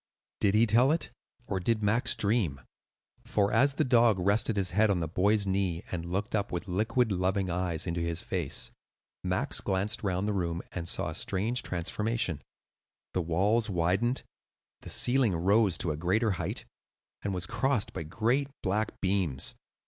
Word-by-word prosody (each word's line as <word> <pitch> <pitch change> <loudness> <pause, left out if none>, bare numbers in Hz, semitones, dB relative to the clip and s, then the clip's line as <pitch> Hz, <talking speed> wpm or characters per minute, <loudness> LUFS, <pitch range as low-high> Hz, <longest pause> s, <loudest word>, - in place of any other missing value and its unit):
Did 100 0 +3
he 110 +2 +5
tell 120 +5 +4
it, 160 - -1 0.4
or 95 - -1
did 110 +4 0
Max 110 +4 +2
dream? 100 - 0 0.6
For 105 -4 +1
as 140 +5 +4
the - - +2
dog 120 -4 +4
rested 100 +4 +1
his 95 -2 0
head 105 +4 +3
on 95 -3 +2
the 80 - -2
boy's 100 +5 +2
knee 95 -3 -1
and 85 -1 -4
looked 105 +6 -2 0.2
with 90 +4 -4
liquid, 110 +5 +1
loving 95 0 0
eyes 85 -2 -1
into 85 -1 -2
his 85 0 -2
face, - - -2 0.5
Max - - 0
glanced 95 +2 -1
round 95 0 -1
the 105 - 0
room 85 -3 -2
and 85 -2 -5
saw - - -1
a - - -5
strange 110 +6 0
transformation: 95 0 -1 0.7
the 90 - +1
walls 100 +8 +1
widened, 95 +8 +1 0.6
the - - -9
ceiling 120 -6 +3
rose 100 +2 +3
to 85 - -1
a 75 - -3
greater 100 +7 +1
height, 90 - -3 0.6
and 100 - -2
was 90 -2 -1
crossed 130 +2 0
by - - -4
great 115 - 0
black 105 +3 -1
beams. 90 -8 0
100 Hz, 165 wpm, -29 LUFS, 90-110 Hz, 0.7 s, he